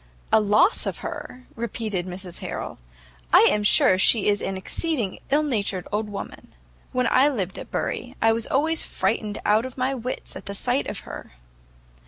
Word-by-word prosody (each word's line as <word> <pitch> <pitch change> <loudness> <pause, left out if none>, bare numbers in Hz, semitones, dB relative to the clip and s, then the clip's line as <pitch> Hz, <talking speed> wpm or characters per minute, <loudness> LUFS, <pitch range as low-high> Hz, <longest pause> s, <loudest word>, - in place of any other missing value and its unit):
"A 220 - +6
loss 210 - +3
of - - -4
her!" 295 -6 -7
repeated 215 -5 -3
Mrs 180 -1 -5
Harrel, - - -6 0.5
"I - - +8
am 210 - +1
sure 190 -2 +5
she 215 +2 +4
is 205 0 +1
an 195 - -3
exceeding 235 - -2
ill 295 +3 +3
natured 205 -9 -1
old 210 0 -1
woman. 200 - -8 0.4
When 250 0 +1
I 275 +3 +5
lived 195 -9 -3
at - - -9
Bury, - - -3
I 225 0 +4
was 230 0 -1
always 315 +4 +2
frightened 210 -2 -1
out 215 +2 +4
of 260 0 -7
my 260 +1 0
wits 255 0 -5
at 190 - -9
the 200 - -3
sight 250 +6 0
of 205 - -4
her." - - -10
220 Hz, 180 wpm, -24 LUFS, 200-260 Hz, 0.5 s, I